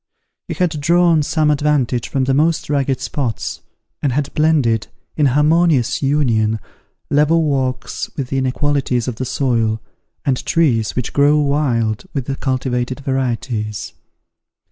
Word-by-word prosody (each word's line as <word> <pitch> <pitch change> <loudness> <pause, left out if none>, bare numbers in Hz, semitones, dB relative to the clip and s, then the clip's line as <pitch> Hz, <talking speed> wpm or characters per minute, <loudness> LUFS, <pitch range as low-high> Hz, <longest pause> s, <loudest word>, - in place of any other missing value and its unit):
He - - -4
had 165 -5 -1
drawn 170 0 +4
some 150 +1 +1
advantage 140 -5 0
from 135 - 0
the 135 +1 +1
most 155 +2 +1
rugged 135 -2 0
spots, 130 -3 -3 0.4
and 140 - +1
had 145 +1 -2
blended, 145 -9 +2 0.3
in 150 -2 +3
harmonious 150 -1 +2
union, 115 -7 +1 0.5
level 150 +3 +3
walks 130 -3 -2
with 135 -3 -3
the 135 - 0
inequalities 130 -2 0
of 120 -3 -3
the 130 - -3
soil, 115 -4 0 0.5
and 130 -3 0
trees 125 -10 +1
which 125 - -3
grow 145 +1 +4
wild 135 - 0
with 135 -3 -2
the 135 - -3
cultivated 130 -1 -2
varieties. 120 -5 -2
135 Hz, 135 wpm, -18 LUFS, 125-150 Hz, 0.5 s, drawn